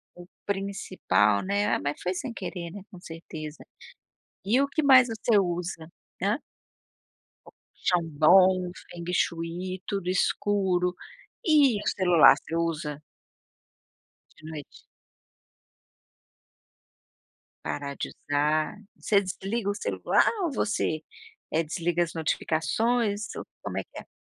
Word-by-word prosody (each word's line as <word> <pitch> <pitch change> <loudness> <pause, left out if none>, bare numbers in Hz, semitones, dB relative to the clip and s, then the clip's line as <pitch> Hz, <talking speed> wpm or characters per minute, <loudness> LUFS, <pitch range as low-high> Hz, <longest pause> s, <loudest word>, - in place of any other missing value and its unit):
O 175 - -11 0.2
principal, 185 - +1
né, 200 +2 0
ah - - -1
mas 145 +1 -3
foi 180 - -1
sem 235 +6 -5
querer 170 -6 -6
né 205 - -8
com 185 - -11
certeza. 160 -3 -9 0.8
E 235 +7 +3
o 280 - +2
que 300 +2 -1
mais 260 -3 +7
você 225 -1 +1
usa 175 -3 -3 0.3
hã? - - +1 1.5
Chandon, 180 +2 +4
Feng 175 0 -9
Shui, 175 +2 -2
tudo 195 -3 -2
escuro, 185 -1 +1 0.5
e 290 - +5
o - - -5
celular 180 -4 +7
você 165 - -6
usa? 155 -3 -2 1.3
De 155 - -16
noite. 155 -3 -9 2.8
Parar 140 -1 -4
de - - -4
usar, 150 +3 0 0.2
você 200 -2 +2
desliga 195 +3 -3
o 200 - -1
celular - - +1 0.2
ou 335 - 0
você, 205 - -1 0.5
eh, 160 +1 +2
desliga 170 +2 0
as 165 - -6
notificações 205 +7 0
ou - - -6 0.2
como - - -5
é - - -4
que - - -11
é? - - -12
180 Hz, 120 wpm, -27 LUFS, 160-205 Hz, 2.8 s, mais